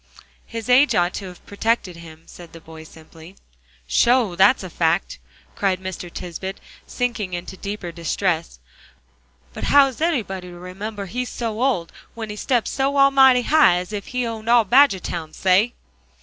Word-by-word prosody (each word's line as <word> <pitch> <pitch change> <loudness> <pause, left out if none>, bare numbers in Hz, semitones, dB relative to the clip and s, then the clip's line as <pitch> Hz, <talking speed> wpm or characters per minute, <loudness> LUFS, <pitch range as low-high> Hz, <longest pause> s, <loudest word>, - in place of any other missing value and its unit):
"His 230 -2 -7
age 250 0 +4
ought 175 -1 +1
to 195 - -6
have 180 -1 -13
protected 200 -3 -1
him," 160 -1 -13
said 175 -1 -14
the 165 - -11
boy 160 0 -13
simply. 160 +3 -15 0.5
"Sho! 235 - +2
that's 195 +5 +4
a 185 - -7
fact," 160 - 0 0.4
cried 190 -2 0
Mr. 185 -2 -7
Tisbett, 185 +2 -7 0.3
sinking 220 -7 -3
in 175 0 -6
deeper 200 -2 -6
distress, 170 - -2 1.0
"but - - -5
how 285 -1 +6
is 265 +1 -6
anybody 210 - -1
to 175 -1 -11
remember 200 +3 -7
he's 250 +6 -4
so 225 -1 -4
old, 245 -11 0 0.2
when 220 -2 -6
he - - -6
steps 240 +2 -1
so 275 +1 -1
almighty 270 -2 +5
high, 305 - +5
as 180 +3 -4
if 200 -1 -5
he 250 -1 -2
owned 225 -1 -5
all 235 -2 +5
Badgertown 190 - +2
say!" 195 +6 +2
200 Hz, 165 wpm, -21 LUFS, 175-240 Hz, 1.0 s, how